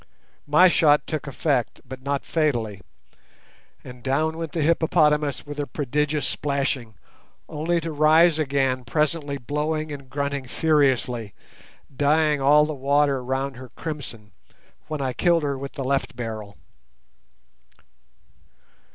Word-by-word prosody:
My 155 +6 +6
shot 150 -4 +4
took 155 -2 -4
effect, 135 -3 -1
but 130 +1 -8
not 140 +1 -2
fatally, 120 - -1 1.0
and 125 -1 -11
down 155 +6 0
went 165 -2 -5
the 160 -1 -1
hippopotamus 150 -3 +2
with 145 0 -7
a 145 - -2
prodigious 150 +1 -1
splashing, 135 -6 -2 0.5
only 170 +3 -1
to 165 0 -4
rise 155 +2 +4
again 135 -3 0
presently 150 +2 -1
blowing 150 +4 -2
and 140 -3 -8
grunting 140 -1 -3
furiously, 130 - +1 0.6
dyeing 150 +1 +2
all 150 +2 +5
the 155 - -3
water 140 -1 +1
round 135 +1 -2
her 130 0 -10
crimson, 120 -9 -7 0.6
when 155 -2 -4
I 130 -2 -1
killed 170 +1 +2
her 140 -1 -1
with 135 +1 -7
the 135 - -4
left 135 +1 -1
barrel. 110 -4 -6
145 Hz, 125 wpm, -24 LUFS, 130-155 Hz, 1.0 s, My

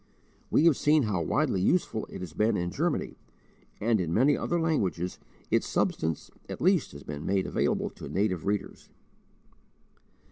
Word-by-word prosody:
We 155 - +4
have 165 -5 +5
seen 150 0 +4
how 100 -6 0
widely 90 +3 +1
useful 110 - +1
it - - -8
has 85 -5 -7
been 105 +6 +2
in 90 0 -2
Germany; - - -2 0.6
and 110 -1 +2
in 85 -2 -2
many 135 - +4
other 175 - -1
languages 95 - -1 0.3
its - - +2
substance 80 -1 -1 0.2
at - - -5
least 180 -2 +2
has 70 - -10
been 75 0 -6
made 95 -1 +1
available - - 0
to - - -9
native 95 -3 -1
readers. 100 -1 -3
100 Hz, 155 wpm, -28 LUFS, 90-145 Hz, 0.6 s, have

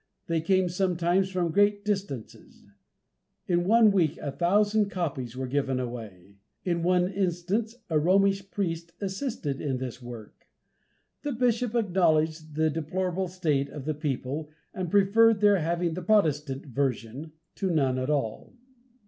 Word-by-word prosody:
They 165 -1 0
came 185 +2 +2
sometimes 180 +1 +1
from 180 -3 -1
great 205 +2 +2
distances. 195 - -4 0.8
In 175 -1 +1
one 225 0 +6
week 175 -6 +2
a 140 - -4
thousand 205 +6 +2
copies 140 - -4
were 130 - -2
given 135 0 -1
away. 105 -6 -7 0.3
In 170 -2 0
one 180 +1 +3
instance 195 +4 -1
a 160 -3 +2
Romish 195 +3 +2
priest 170 -3 -3
assisted 195 - -3
in 135 -3 -1
this 125 -1 -6
work. 120 -3 -11 0.7
The 290 -1 -3
bishop 245 -1 0
acknowledged 160 -7 +1
the 155 0 +2
deplorable 180 +4 -2
state 155 -6 0
of 140 -1 -8
the 155 - 0
people, 145 0 -3 0.2
and 185 -2 -3
preferred 205 +3 +4
their 205 -2 +5
having 170 +1 -1
the 180 - -4
Protestant 150 -9 +1
version 135 +2 -3 0.2
to 195 - -2
none 135 -6 +1
at 130 +2 -2
all. 135 - -2
170 Hz, 140 wpm, -27 LUFS, 145-195 Hz, 0.8 s, one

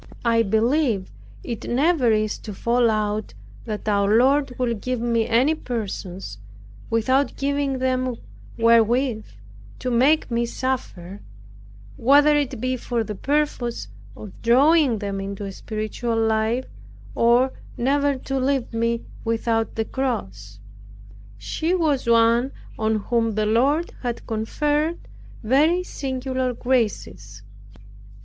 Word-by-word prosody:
I 230 -1 +4
believe 225 0 +1 0.3
it 235 -3 -5
never 270 -1 +2
is 215 -1 0
to 210 -3 -8
fall 235 +3 +2
out, 215 0 -2 0.3
that 215 -2 -5
our 205 +1 +3
Lord 270 +2 +3
will 245 -2 0
give 250 +3 -3
me 230 -1 0
any 255 +7 +3
persons 195 - -5 0.5
without 260 +5 +1
giving 280 -1 -1
them 255 -1 0 0.4
wherewith 230 0 +3 0.5
to 250 - -3
make 265 +5 +3
me 235 0 0
suffer, 205 -8 -4 0.8
whether 290 +4 +5
it 275 -5 -1
be 255 +2 -1
for 240 -1 -2
the 215 - -5
purpose 245 - -1 0.3
of 210 - -9
drawing 270 +2 +4
them 200 -1 -4
into 200 +1 -5
a 195 - -5
spiritual 215 +3 -3
life, 225 +3 +1 0.5
or 240 +3 +3 0.2
never 280 +3 +1
to 270 +1 -3
leave 260 -2 -1
me 230 0 -1 0.2
without 225 0 -1
the 225 - -1
cross. 105 - -4 0.8
She 315 - -1
was 300 -8 0
one 235 +3 +3 0.3
on 220 0 +1
whom 225 +1 0
the 215 0 +1
Lord 275 +10 +1
had 240 -2 -4
conferred 295 +9 -1 0.4
very 305 +10 +3
singular 260 -4 -3
graces. 105 - -2
235 Hz, 120 wpm, -23 LUFS, 220-265 Hz, 0.8 s, whether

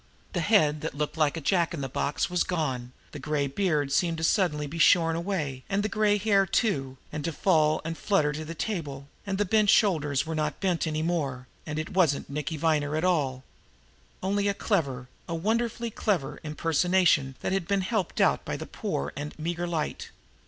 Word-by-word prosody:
That 175 - 0
head 155 -6 +3
that - - -4
looked 150 0 -2
like 155 -1 +1
a - - -4
jack 170 +1 +1
in 150 - -5
the 135 - -2
box 140 +2 -1
was 180 0 +1
gone; 130 -8 -2 0.2
the - - -7
gray 150 -2 -1
beard 150 -2 0
seemed 165 +2 +1
suddenly 160 -7 +1
to - - -7
be 165 - -5
shorn 165 -1 +5
away, 165 -7 -2
and 200 +1 +1
the 215 - 0
gray 210 0 +2
hair 200 -2 +3
too, 135 - 0
and 150 -1 -4
to 165 - -1
fall 155 -2 +2
and 165 0 -3
flutter 155 -6 +1
to 155 +1 -4
the 165 +2 -7
table, 145 -8 -4 0.2
and 195 -1 -1
the 205 - +1
bent 210 +1 +3
shoulders 155 - +3
were 160 - -4
not 155 -1 -2
bent 180 -4 0
any 155 0 -1
more, 140 -7 -1 0.2
and 150 -1 -3
it 155 +4 -3
wasn't 165 -7 +2
Nicky 150 +2 -3
Viner 150 -1 +1
at 155 - -1
all 140 -8 +1 0.8
only 200 +1 +1
a 200 - +1
clever, 140 - -1 0.2
a 165 - -1
wonderfully 230 +5 -1
clever, 190 -11 -1
impersonation 160 -2 +2
that - - -2
had 190 -3 -1
been 200 -1 +1
helped 205 -1 -2
out - - +3
by - - -3
the - - -6
poor 70 +2 -3
and 145 +2 -6
meager 175 +2 -2
light. 160 -3 -3
165 Hz, 200 wpm, -27 LUFS, 150-190 Hz, 0.8 s, shorn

